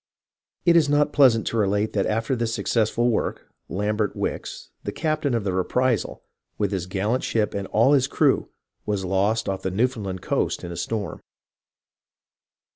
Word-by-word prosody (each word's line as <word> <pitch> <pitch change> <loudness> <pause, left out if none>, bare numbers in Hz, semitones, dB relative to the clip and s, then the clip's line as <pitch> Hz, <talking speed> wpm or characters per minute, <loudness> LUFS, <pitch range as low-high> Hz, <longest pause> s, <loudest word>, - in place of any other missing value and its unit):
It 170 -1 +5
is 155 -4 +4
not 145 0 +2
pleasant 125 -6 +5
to 115 - -2
relate 105 0 +1
that 100 -2 +1
after 115 +4 0
his 115 -2 -1
successful 115 +1 +1
work, - - -2 0.2
Lambert 105 +2 -1
Wickes, - - -4
the - - -3
captain 155 -5 -1
of 115 - -1
the 95 -2 -1
Reprisal, 120 +5 0 0.3
with 100 -2 0
his 95 -3 -2
gallant 105 +7 -1
ship 105 -2 0
and 100 -1 -3
all 115 +6 +4
his 135 -2 +3
crew, - - +2 0.3
was 105 -3 -2
lost 100 +4 +1
off 95 -1 -2
the 95 - -1
Newfoundland 100 -3 -1
coast - - -1
in 85 - -5
a - - -5
storm. 100 0 -3
110 Hz, 165 wpm, -24 LUFS, 95-125 Hz, 0.3 s, It